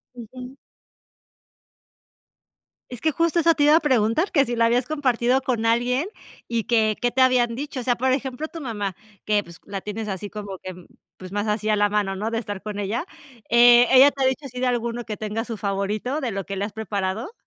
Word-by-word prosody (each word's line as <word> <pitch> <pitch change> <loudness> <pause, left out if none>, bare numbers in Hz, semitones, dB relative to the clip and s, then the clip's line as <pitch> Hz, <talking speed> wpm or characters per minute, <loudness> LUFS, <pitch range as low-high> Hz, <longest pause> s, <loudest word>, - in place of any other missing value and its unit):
Ujú. 250 +2 -10 2.4
Es 245 - -8
que 315 - +2
justo 335 +2 +1
eso 330 0 +4
te 290 - +1
iba 295 +1 +6
a 325 - +6
preguntar, 260 - +1
¿que 280 -5 +3
si 240 -1 -3
la 230 - +3
habías 240 +2 +2
compartido 260 -3 +1
con 240 -3 -1
alguien 245 +6 +1 0.4
y 230 -2 -2
que, 220 -2 +2
qué 245 0 +1
te 260 - +1
habían 245 -2 +3
dicho?, 280 0 -5
o - - -4
sea, 245 0 +1
por 260 +2 0
ejemplo, 265 +3 -2
tu 330 - -9
mamá 205 -7 -4 0.3
que, 210 -1 +2
pues, 170 -1 -14
la 195 -1 -5
tienes 210 +1 -5
así 195 +1 -5
como 205 -2 -7
que, 185 -1 -7 0.4
pues, 185 0 -10
más 205 +1 -2
así 215 +1 -1
a 215 - +4
la 205 0 +2
mano, 205 -2 0
¿no?, 210 +4 -3
de 230 - -1
estar 205 -4 -6
con 210 -1 -6
ella, 220 - -2 0.4
eh, 240 +1 +7
¿ella 265 +2 +8
te 275 -1 -3
ha - - +4
dicho 265 +2 -2
así 250 -2 -7
de 255 - +1
alguno 235 -1 -2
que 215 -2 -5
tenga 215 +2 -3
su 230 -2 -5
favorito 205 +7 -2
de 255 -6 -3
lo 195 -1 -4
que 195 - -5
le 200 - -1
has 205 - -8
preparado? 215 - -3
235 Hz, 220 wpm, -23 LUFS, 210-260 Hz, 2.4 s, ella